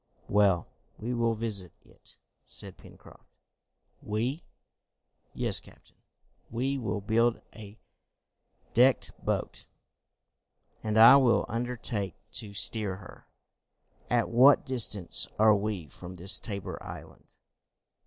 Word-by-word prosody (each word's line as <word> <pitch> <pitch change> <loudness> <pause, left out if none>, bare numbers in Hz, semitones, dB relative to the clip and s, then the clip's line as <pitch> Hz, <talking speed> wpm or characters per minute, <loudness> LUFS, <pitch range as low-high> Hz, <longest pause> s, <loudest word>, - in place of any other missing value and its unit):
"Well, 100 -4 +2 0.3
we 120 +3 -4
will 115 -1 0
visit 105 -6 -3
it," - - -13 0.3
said - - -7
Pencroft. - - -18 0.7
"We?" 120 +9 -3 0.9
"Yes, - - +4
captain. - - -21 0.5
We 130 +4 -2
will 105 -3 -3
build 115 +3 +1
a 105 0 -12 1.0
decked 125 +3 +3
boat, - - -4 1.2
and 110 0 -1
I 115 +5 +9
will 130 -4 +2
undertake 115 -4 -4 0.2
to 105 -3 -6
steer 105 -1 0
her. 95 - -14 0.8
At 120 -2 +1
what 130 +5 +5
distance 105 -8 +2
are 110 0 +5
we 100 -5 -3
from 90 +5 -11
this 90 +3 +3
Tabor 100 -3 -6
Island?" - - -12
110 Hz, 105 wpm, -28 LUFS, 100-120 Hz, 1.2 s, I